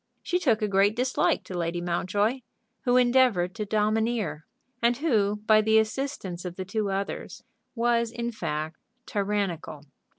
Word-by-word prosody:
She 360 Hz, -, 0 dB
took 230 Hz, -10 st, +2 dB
a -, -, +2 dB
great 200 Hz, +2 st, +3 dB
dislike 255 Hz, +2 st, +1 dB
to 185 Hz, -, -8 dB
Lady 170 Hz, 0 st, -1 dB
Mountjoy, 195 Hz, +7 st, 0 dB, 0.5 s
who 245 Hz, 0 st, +4 dB
endeavored 240 Hz, -8 st, +3 dB
to 210 Hz, 0 st, -4 dB
domineer; 215 Hz, -5 st, 0 dB, 0.3 s
and 240 Hz, 0 st, +3 dB
who, 210 Hz, -8 st, +1 dB
by 215 Hz, 0 st, +6 dB
the 220 Hz, +1 st, +3 dB
assistance 220 Hz, -6 st, -2 dB
of 180 Hz, -1 st, -6 dB
the 185 Hz, -, -5 dB
two 205 Hz, +2 st, -1 dB
others, 195 Hz, +1 st, -4 dB, 0.3 s
was 235 Hz, 0 st, +2 dB
in 235 Hz, +1 st, -4 dB
fact 155 Hz, -6 st, -4 dB, 0.3 s
tyrannical. 195 Hz, -, -2 dB
210 Hz, 145 wpm, -27 LUFS, 185-235 Hz, 0.5 s, by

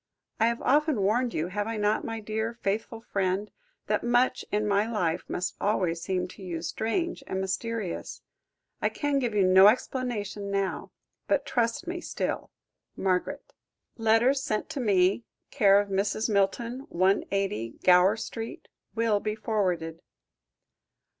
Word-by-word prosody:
I 225 Hz, -, +4 dB
have 235 Hz, 0 st, -1 dB
often 290 Hz, -5 st, +3 dB
warned 235 Hz, +5 st, +2 dB
you, 160 Hz, -1 st, -2 dB
have 205 Hz, +2 st, -2 dB
I 225 Hz, -1 st, -3 dB
not, 210 Hz, +1 st, +1 dB
my 225 Hz, 0 st, -4 dB
dear, 220 Hz, +2 st, -3 dB
faithful 220 Hz, +3 st, -2 dB
friend, 195 Hz, -1 st, -1 dB, 0.3 s
that -, -, 0 dB
much 245 Hz, +1 st, +2 dB
in 210 Hz, +1 st, +1 dB
my 205 Hz, +2 st, +1 dB
life 175 Hz, -6 st, 0 dB
must 180 Hz, -, -2 dB
always 180 Hz, -5 st, 0 dB
seem 180 Hz, -1 st, -1 dB
to 200 Hz, -, -13 dB
you 170 Hz, -3 st, -5 dB
strange 230 Hz, -, -2 dB
and 190 Hz, -, -2 dB
mysterious. 190 Hz, 0 st, -3 dB, 0.6 s
I -, -, +2 dB
can 290 Hz, -2 st, 0 dB
give 240 Hz, -5 st, -1 dB
you 200 Hz, -, +4 dB
no 190 Hz, +2 st, +8 dB
explanation 215 Hz, -4 st, -1 dB
now. 195 Hz, -1 st, -2 dB, 0.4 s
But -, -, +1 dB
trust 235 Hz, +7 st, 0 dB
me 350 Hz, 0 st, -4 dB
still. -, -, -3 dB, 0.5 s
MARGARET. 190 Hz, +10 st, -1 dB, 0.4 s
"Letters 230 Hz, +4 st, +3 dB
sent 215 Hz, -5 st, -2 dB
to -, -, -4 dB
me, 200 Hz, -2 st, +3 dB, 0.3 s
c/o 205 Hz, -5 st, +5 dB
Mrs. 200 Hz, +2 st, 0 dB
Milton, 230 Hz, +6 st, 0 dB
180, 185 Hz, -, 0 dB
Gower 185 Hz, +4 st, +6 dB
Street, 225 Hz, +1 st, -6 dB, 0.3 s
will 225 Hz, -2 st, +2 dB
be 215 Hz, +1 st, -2 dB
forwarded." 180 Hz, -7 st, -1 dB
210 Hz, 140 wpm, -28 LUFS, 190-230 Hz, 0.6 s, no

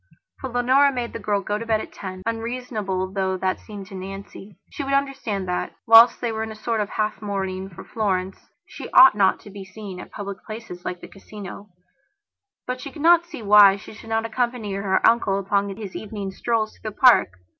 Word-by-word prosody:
For 265 Hz, -, -5 dB
Leonora 255 Hz, +4 st, +3 dB
made 245 Hz, -3 st, -4 dB
the -, -, -5 dB
girl 205 Hz, -1 st, 0 dB
go 210 Hz, +1 st, -2 dB
to 230 Hz, -, -6 dB
bed 220 Hz, -1 st, +2 dB
at -, -, -8 dB
ten, 185 Hz, -1 st, -8 dB
unreasonable 225 Hz, -5 st, -3 dB
though 190 Hz, -1 st, -1 dB
that 185 Hz, 0 st, -1 dB
seemed 205 Hz, -2 st, -9 dB
to -, -, -12 dB
Nancy. 195 Hz, 0 st, -9 dB
She 285 Hz, -, -5 dB
would 275 Hz, 0 st, 0 dB
understand 265 Hz, -9 st, -2 dB
that, 180 Hz, -, -3 dB
whilst 225 Hz, +1 st, +8 dB
they 235 Hz, -, -2 dB
were 220 Hz, 0 st, -3 dB
in 220 Hz, 0 st, -4 dB
a -, -, -8 dB
sort 220 Hz, 0 st, -2 dB
of 205 Hz, -, -3 dB
half 215 Hz, +1 st, -2 dB
mourning 190 Hz, -2 st, -3 dB
for 170 Hz, -, -11 dB
Florence, 190 Hz, -4 st, -3 dB, 0.2 s
she -, -, -9 dB
ought 260 Hz, -2 st, +9 dB
not 200 Hz, -2 st, +2 dB
to 205 Hz, -, -13 dB
be 200 Hz, 0 st, -8 dB
seen 190 Hz, -1 st, -9 dB
at -, -, -10 dB
public 200 Hz, -2 st, -7 dB
places, 215 Hz, -5 st, -9 dB
like 180 Hz, -, -5 dB
the -, -, -9 dB
Casino; 200 Hz, 0 st, -10 dB, 1.0 s
but 255 Hz, 0 st, -4 dB
she 280 Hz, -, -7 dB
could 300 Hz, 0 st, -8 dB
not 340 Hz, 0 st, +5 dB
see 320 Hz, -10 st, -9 dB
why 205 Hz, -1 st, +7 dB
she 200 Hz, -, -12 dB
should 225 Hz, -, -13 dB
not 225 Hz, 0 st, 0 dB
accompany 235 Hz, -2 st, -2 dB
her 195 Hz, -1 st, +2 dB
uncle 225 Hz, -4 st, +3 dB
upon 200 Hz, +1 st, 0 dB
his 205 Hz, -4 st, -8 dB
evening 205 Hz, -2 st, -5 dB
strolls 220 Hz, +2 st, -2 dB
though 215 Hz, -, -4 dB
the 210 Hz, -, -14 dB
park. 245 Hz, -, +5 dB
210 Hz, 210 wpm, -23 LUFS, 195-235 Hz, 1.0 s, ought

